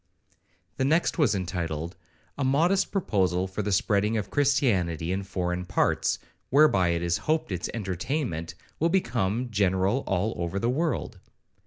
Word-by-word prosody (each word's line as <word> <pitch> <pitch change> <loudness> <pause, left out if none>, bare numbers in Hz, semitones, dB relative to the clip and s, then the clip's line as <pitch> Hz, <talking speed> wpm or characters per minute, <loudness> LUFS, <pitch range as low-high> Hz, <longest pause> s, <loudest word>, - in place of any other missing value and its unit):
The - - 0
next 160 +5 +2
was 125 -9 +3
entitled, 85 -3 -3 0.4
'A 140 - -2
modest 165 +9 +2
proposal 95 - +1
for 95 +3 -4
the 105 0 -2
spreading 105 +3 +2
of 105 - -4
Christianity 95 - +1
in 95 +1 -1
foreign 90 -2 -3
parts, 95 +2 +1 0.3
whereby 130 -11 +5
it 85 0 0
is 85 0 0
hoped 155 -8 +1
its 90 -1 -3
entertainment 95 - -3 0.2
will 165 - +2
become 120 - 0
general 95 +3 +2
all 100 +4 0
over 85 +2 -3
the 115 +5 +1
world.' 160 +4 -2
100 Hz, 145 wpm, -27 LUFS, 90-135 Hz, 0.4 s, whereby